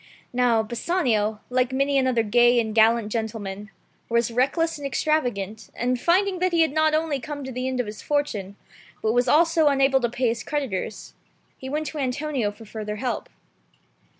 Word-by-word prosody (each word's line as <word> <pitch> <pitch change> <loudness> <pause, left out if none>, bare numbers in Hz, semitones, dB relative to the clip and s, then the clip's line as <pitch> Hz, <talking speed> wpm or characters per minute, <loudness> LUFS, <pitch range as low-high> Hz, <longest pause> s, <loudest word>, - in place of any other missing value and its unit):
Now 245 -3 +3
Bassanio, 225 - 0
like 250 0 +1
many 275 +2 +1
another 260 -4 +2
gay 240 +3 +4
and 220 -2 -1
gallant 225 0 +3
gentleman, 210 -3 -4 0.4
was 235 0 +1
reckless 295 +7 +1
and 280 - -3
extravagant, 240 -8 -1
and 250 +1 -1
finding 370 +2 +2
that 365 0 +1
he 335 - +4
had 320 - 0
not 310 +1 +2
only 310 -3 0
come 290 +1 -6
to 265 - -6
the 255 +1 -3
end 260 -1 -2
of 250 - 0
his 210 0 -8
fortune, 220 -10 -2 0.5
but 220 0 +2
was 245 +1 +2
also 325 +2 +4
unable 270 -1 +3
to 240 - +1
pay 245 +1 0
his 230 0 -3
cred 290 -5 -2
itors, 190 +2 -5 0.4
he 265 - -8
went 305 +3 -2
to 305 - -5
Antonio 265 -3 -1
for 205 +2 -12
further 210 0 -5
help. 250 +3 -3
250 Hz, 180 wpm, -24 LUFS, 225-290 Hz, 0.5 s, gay